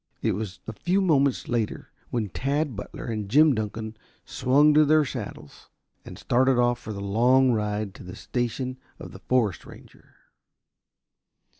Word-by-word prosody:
It - - +2
was 100 -2 -5
a 110 - -6
few 180 - 0
moments 140 -8 +2
later 115 -3 -3 0.2
when 110 -4 -2
Tad 140 - -2
Butler 100 - -8
and 110 -4 -4
Jim 150 +5 +5
Dunkan 110 0 -4 0.3
swung 140 +4 +3
to 155 +1 +6
their 155 0 +4
saddles 110 - -8 0.3
and - - -10
started 130 +1 +2
off 120 0 +2
for 110 - -8
their 100 -1 -6
long 125 +6 +3
ride 105 -2 -2
to - - -12
the 90 0 -9
station 125 +1 -3 0.2
of - - -10
the - - -11
forest 115 -8 0
ranger. - - -16
120 Hz, 155 wpm, -25 LUFS, 105-135 Hz, 0.3 s, to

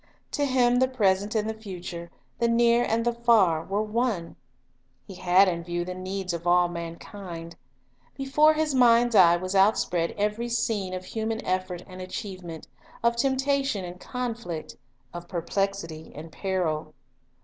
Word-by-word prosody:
To 290 - 0
Him 245 -2 +3
the 260 - +4
present 205 -4 +1
and 215 0 +1
the 220 - -2
future, 180 -5 -7 0.3
the 235 - +3
near 235 +1 +4
and 230 0 0
the 240 - +2
far, 220 -9 +3
were 200 +4 -1
one. 215 -5 -1 0.7
He 195 - -10
had 185 +2 +4
in 170 -2 -1
view 175 0 -3
the 180 - -4
needs 185 0 -4
of 170 +1 -4
all 175 0 +5
man 170 -1 -5
kind. 170 -4 -9 0.6
Before 290 +3 +4
His 310 -1 0
mind's 240 -2 +5
eye 175 -4 +7
was 185 +2 -4
outspread 190 -4 +2
every 210 +3 -1
scene 215 -5 -1
of 185 0 -6
human 220 +1 -3
effort 185 -1 -2
and 185 -1 -10
achievement, 185 -3 -7 0.4
of 235 0 +3
temptation 270 -4 0
and 175 +1 -9
con 250 +1 -3
flict, 175 -9 -7 0.4
of 175 0 -8
perplexity 170 -2 -3
and 160 +2 -9
peril. 160 -5 -2
195 Hz, 160 wpm, -26 LUFS, 175-235 Hz, 0.7 s, eye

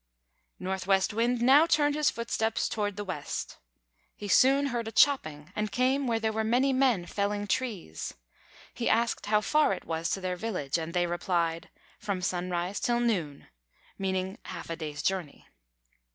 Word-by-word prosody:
Northwest 190 +2 0
Wind 235 +2 +1
now 285 +6 +6
turned 295 -3 +3
his 300 0 +2
footsteps 225 -1 -1
toward 205 -2 -2
the 205 - -4
west. 180 -7 -5 0.6
He 205 - -7
soon 270 +7 +5
heard 235 -2 -2
a - - -4
chopping, 155 - +2
and 210 -1 -2
came 260 +4 +1
where 230 -1 +1
there 220 -1 -1
were 220 0 0
many 250 +5 +2
men 255 -9 +2
felling 205 +2 -2
trees. 200 - -3 0.6
He 235 - -1
asked 230 -1 +1
how 210 0 +3
far 300 -2 +3
it - - -7
was 165 0 -2
to - - -1
their 185 -1 -2
village, 175 -8 -2
and 165 +2 -5
they 175 0 +3
replied: 170 -1 -1 0.3
"From 200 -3 -3
sunrise 180 +1 -2
till 240 0 +1
noon," 180 -12 -1 0.5
meaning 190 0 -2
half 170 -2 -7
a - - -2
day's 150 -3 -6
journey. 185 -6 -2
205 Hz, 165 wpm, -29 LUFS, 175-235 Hz, 0.6 s, now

